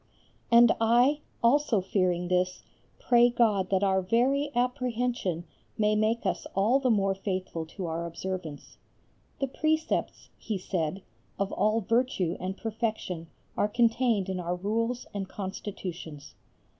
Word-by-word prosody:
And 235 0 +8
I, 245 +6 +4 0.2
also 245 -2 +4
fearing 185 -2 0
this, 180 0 0 0.3
pray 240 -1 +4
God 220 -5 +2
that 190 0 +2
our 190 -1 +3
very 255 +9 +2
apprehension 245 - -1 0.3
may 210 0 +2
make 220 +2 +1
us - - -1
all 215 +8 +3
the 265 -2 +1
more 195 -4 +2
faithful 185 -4 -4
to 185 +2 -6
our 165 +1 -3
observance. 170 -3 -6 0.6
"The 275 - +1
precepts," 315 +4 -1
he 215 - -3
said, 185 0 -3 0.3
"of 200 0 -1
all 215 +3 +1
virtue 225 -6 0
and 190 +1 -4
perfection 220 -7 -3 0.3
are 205 - +2
contained 230 -2 +2
in 190 -1 -3
our 175 0 -2
Rules 230 +6 -1
and 195 -2 -4
Constitutions." 180 -6 -7
205 Hz, 130 wpm, -28 LUFS, 185-235 Hz, 0.6 s, And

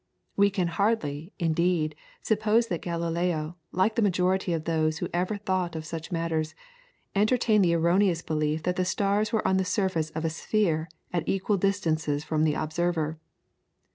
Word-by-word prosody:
We 200 0 +5
can 185 -3 0
hardly, 170 -4 -1
indeed, 165 -2 +1 0.3
suppose 220 +2 +2
that 175 - -2
Galileo, 170 -1 -2
like 190 +4 +2
the 230 - +1
majority 185 -1 +1
of 165 -2 -1
those 155 -1 0
who - - -2
ever 180 +4 0
thought 185 -4 -1
of 160 -1 -5
such 165 +2 -6
matters, 165 -2 -1 0.6
entertained 215 0 +3
the 170 -2 +3
erroneous 170 +1 +2
belief 155 0 -1
that 180 +1 -1
the 185 - +2
stars 200 +3 +1
were 220 - +1
on 190 - +3
the 190 - +2
surface 185 -5 0
of 160 +1 -2
a 160 - 0
sphere 165 -2 0 0.2
at 170 -3 -1
equal 195 +1 +1
distances 160 -7 0
from 155 0 +1
the 150 - +2
observer. 160 -1 -1
175 Hz, 165 wpm, -27 LUFS, 160-195 Hz, 0.6 s, We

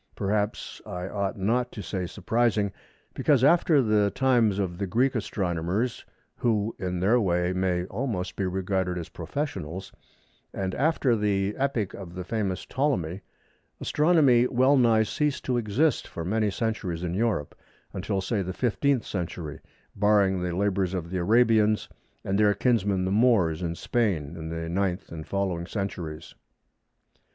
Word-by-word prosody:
Perhaps 105 +1 -2
I 90 +1 -5
ought 100 0 -2
not 120 +6 0
to 105 - -6
say 90 0 -3
"surprising," 110 -1 0 0.4
because 140 -5 +2
after 155 -1 +5
the 105 -2 +3
times 120 -5 +2
of 90 -3 -2
the 100 - -1
Greek 125 +8 +2
astronomers 100 +2 -2 0.3
(who 110 -2 0
in 90 -1 -2
their 110 +6 +4
way 90 -2 +1
may 90 -1 0
almost 95 -4 -3
be 95 - -1
regarded 95 -1 -1
as 85 - -6
professionals), 95 - -5 0.6
and 95 -1 -2
after 140 -4 +2
the 100 -1 0
epoch 130 -8 -1
of 90 -3 -9
the 90 - -4
famous 100 -2 -2
Ptolemy, 100 - -1 0.6
Astronomy 150 -7 +4
well 130 +3 +4
nigh 115 -4 +4
ceased 145 +5 -1
to 125 -2 +1
exist 120 +6 +1
for 85 - -6
many 105 +3 +1
centuries 95 -5 -2
in 85 -1 -2
Europe, 100 -8 0 0.4
until, 95 +1 -2
say, 100 +2 -1
the 95 0 -4
15th 130 +3 +1
century, 85 -4 -5 0.4
barring 100 -2 +3
the 90 -1 -2
labours 95 -1 0
of 85 -2 -4
the 95 - -1
Arabians 110 +1 +3 0.4
and 95 +1 0
their 105 -1 +4
kinsmen 100 -6 +1
the 95 - -1
Moors 100 -8 +3
in 85 -1 -2
Spain 95 - -1
in 80 -1 -6
the 80 0 -4
9th 95 +2 -2
and 80 -2 -7
following 95 -4 -2
centuries. 85 -7 -5
100 Hz, 150 wpm, -26 LUFS, 90-115 Hz, 0.6 s, after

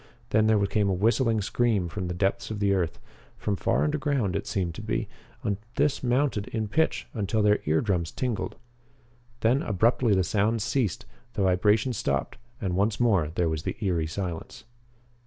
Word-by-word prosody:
Then 110 0 +4
there 110 -1 +4
came 100 0 +1
a - - +2
whistling 115 +3 +2
scream 105 -3 +1
from 90 +2 -4
the 90 - -3
depths 95 +2 0
of 110 -2 -4
the 100 -1 +2
earth 90 -4 0 0.4
from 105 - -1
far 115 +5 +1
underground 145 - 0
it - - -3
seemed 90 -4 -1
to - - -7
be - - -2 0.4
and 100 -2 0 0.2
this 145 0 +1
mounted 125 -4 +1
in 110 -2 -3
pitch 160 +8 +1
until 105 -1 0
their 105 0 +4
eardrums 85 +1 +1
tingled. 120 -6 -2 0.9
Then 125 +5 +3
abruptly 110 +2 +2
the 95 - +3
sounds 105 +4 +1
ceased, 120 -5 -1 0.3
the 100 - 0
vibration 105 +6 +3
stopped, 70 - -2 0.2
and 95 -4 -2
once 100 +2 +1
more 100 -11 +3
there 85 - +1
was 80 -1 -1
the - - -4
eery 90 -7 0
silence. 85 -1 -5
105 Hz, 175 wpm, -27 LUFS, 95-115 Hz, 0.9 s, Then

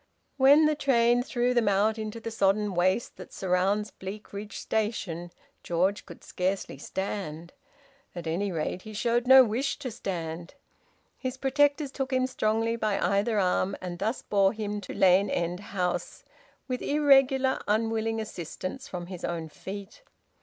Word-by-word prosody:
When 285 +3 +7
the 305 - +3
train 245 -4 +3
threw 245 0 0
them 240 -3 +2
out 210 +3 +2
into 215 +1 -5
the 230 0 -6
sodden 205 -1 +1
waste 185 +6 +1
that - - -10
surrounds 195 +3 0
Bleakridge 205 +1 -8
Station, 200 -6 -2 0.3
George 185 +5 0
could 170 - -12
scarcely 185 -6 -2
stand. 175 -2 -5 0.6
At 175 -1 -6
any 185 +5 -1
rate 170 +2 -3
he 215 +2 -10
showed 235 +3 0
no 265 0 +10
wish 250 +5 -1
to 255 - -5
stand. 170 - -5 0.6
His 255 -1 -4
protectors 285 +2 +2
took 270 0 -3
him 255 0 +2
strongly 225 -2 0
by 215 -3 0
either 205 +3 +1
arm, 185 +1 +1
and 175 -1 -6
thus 220 +5 -2
bore 195 -1 +3
him 210 -1 -4
to - - -7
Lane 190 +1 +4
End 175 0 -1
House, 190 -3 -3 0.4
with 255 -2 -3
irregular 270 -2 +4
unwilling 225 +1 0
assistance 195 - -6
from 175 -1 -6
his 180 -1 -9
own 165 -2 -3
feet. 200 - -9
210 Hz, 150 wpm, -28 LUFS, 185-240 Hz, 0.6 s, no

